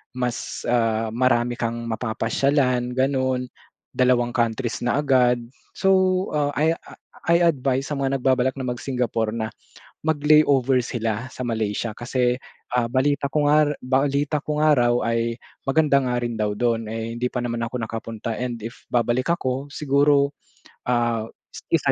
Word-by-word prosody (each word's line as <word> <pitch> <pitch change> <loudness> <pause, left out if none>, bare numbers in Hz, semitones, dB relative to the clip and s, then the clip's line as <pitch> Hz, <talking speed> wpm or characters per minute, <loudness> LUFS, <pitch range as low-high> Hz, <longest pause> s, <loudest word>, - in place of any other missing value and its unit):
mas, 125 -1 -3
ah, 115 -2 +1
marami 120 0 +2
kang 115 0 -2
mapapasyalan 125 +2 0
gano'n, 130 -1 +1 0.5
dalawang 125 -1 +3
countries 120 0 0
na 140 +4 +1
agad. 125 -4 +3 0.4
So, 195 0 +2 0.4
ah, 145 -1 +1
I 160 +2 +3 0.5
I 170 +1 +4
advice 135 -5 +1
sa 145 - -2
mga 135 0 0
nagbabalak 130 0 +2
na 130 -2 -5
mag-Singapore 120 -3 -2
na 110 -1 -2 0.5
mag-layover 145 -4 +3
sila 115 +1 -3
sa 125 - -5
Malaysia 110 -1 -2
kasi, 125 0 0 0.4
ah, 120 -1 +1
balita 140 +1 +1
ko 150 -1 +2
nga 150 0 +4
balita 140 +3 0
ko 150 0 -2
nga 155 -1 +5
raw 120 -1 +3
ay 115 0 0 0.3
maganda 140 0 +3
nga 125 -1 0
rin 120 -1 -3
daw 105 -1 0
do'n, 115 -2 0
eh, 115 0 -4
hindi 125 +1 -1
pa 125 - -1
naman 120 -1 -2
ako 115 +2 -4
nakapunta 115 0 -4
and 120 -1 -3
if 115 - -8
babalik 120 +1 +1
ako 130 -4 -2
siguro, 140 0 +3 0.6
ah, 120 -2 +1 0.5
1 - - +3
125 Hz, 145 wpm, -23 LUFS, 115-140 Hz, 0.6 s, nga